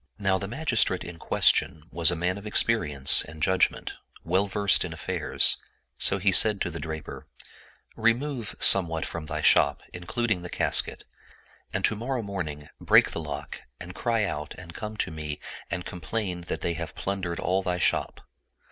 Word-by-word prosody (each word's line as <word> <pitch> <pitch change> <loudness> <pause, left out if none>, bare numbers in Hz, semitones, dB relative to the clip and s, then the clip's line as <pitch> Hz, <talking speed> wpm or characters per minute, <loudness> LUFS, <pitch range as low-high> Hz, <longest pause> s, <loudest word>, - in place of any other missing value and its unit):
Now 95 -2 +1
the 100 - -4
magistrate 120 - 0
in 85 -1 -9
question 75 -2 +2
was 85 0 +3
a 85 - +1
man 90 +4 -1
of 105 - -9
experience 75 -12 +3
and 80 +1 -11
judgment, 95 -1 +1 0.3
well 95 +4 +1
versed 100 0 +2
in - - -5
affairs; - - 0 0.4
so - - +3
he 100 +1 +2
said 105 +2 +5
to 90 - -1
the 85 - -6
draper, 80 -1 -7 0.4
" - - -29 0.2
Remove 125 -2 -4
somewhat 80 -4 +5
from 80 -2 -6
thy - - -3
shop, - - +4
including 105 +3 -2
the 90 - -7
casket, - - +1 0.7
and - - 0
to 110 - +1
morrow 120 +2 -3
morning 80 -8 -5
break - - +5
the - - -4
lock 75 -2 -6 0.2
and 90 0 -8
cry 115 0 0
out 75 -7 -4
and 85 -2 -11
come 105 +4 -6
to 95 - -1
me 75 -2 -5 0.3
and 90 - -3
complain 90 0 -4
that - - -4
they 85 - -1
have 85 -1 -6
plundered 95 -3 -3
all 95 +1 +1
thy 90 -1 -1
shop. - - 0
90 Hz, 175 wpm, -26 LUFS, 85-105 Hz, 0.7 s, said